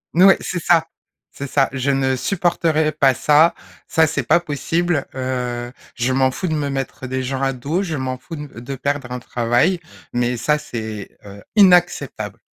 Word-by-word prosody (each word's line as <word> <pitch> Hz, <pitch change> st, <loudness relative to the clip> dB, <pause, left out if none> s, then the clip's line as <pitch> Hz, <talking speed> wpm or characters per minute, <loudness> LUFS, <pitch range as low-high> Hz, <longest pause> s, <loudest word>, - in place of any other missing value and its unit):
N 175 Hz, -, +6 dB
ouais, 195 Hz, 0 st, +8 dB
c'est 180 Hz, -, -3 dB
ça. 165 Hz, -2 st, +4 dB, 0.5 s
C'est 140 Hz, -, -6 dB
ça 135 Hz, 0 st, +2 dB
je 130 Hz, +1 st, 0 dB
ne 135 Hz, -1 st, +1 dB
supporterai 160 Hz, -1 st, +1 dB
pas 140 Hz, -3 st, +3 dB
ça. 150 Hz, +6 st, +4 dB, 0.3 s
Ça 160 Hz, -1 st, +3 dB
c'est 145 Hz, -2 st, -2 dB
pas 120 Hz, -, +4 dB
possible, 165 Hz, 0 st, -1 dB
heu, 125 Hz, -2 st, -3 dB, 0.2 s
je 125 Hz, +2 st, 0 dB
m'en 130 Hz, 0 st, +3 dB
fous 185 Hz, -, -3 dB
de 160 Hz, -, -1 dB
me 145 Hz, -2 st, -1 dB
mettre 135 Hz, -1 st, -4 dB
des 130 Hz, +1 st, -2 dB
gens 130 Hz, +1 st, -3 dB
à 135 Hz, 0 st, +1 dB
dos, 145 Hz, +9 st, -2 dB
je 165 Hz, -5 st, -3 dB
m'en 130 Hz, -2 st, -3 dB
fous 165 Hz, -, -9 dB
de 145 Hz, -, -7 dB
m 135 Hz, -5 st, -10 dB
de 135 Hz, +3 st, -5 dB
perdre 140 Hz, -1 st, -3 dB
un 125 Hz, -, -3 dB
travail, 120 Hz, +9 st, +1 dB, 0.3 s
mais 120 Hz, 0 st, 0 dB
ça 150 Hz, +5 st, +1 dB
c'est, 110 Hz, -7 st, -7 dB
heu, 100 Hz, 0 st, -11 dB
inacceptable. 180 Hz, -4 st, +3 dB
135 Hz, 190 wpm, -20 LUFS, 125-160 Hz, 0.5 s, ouais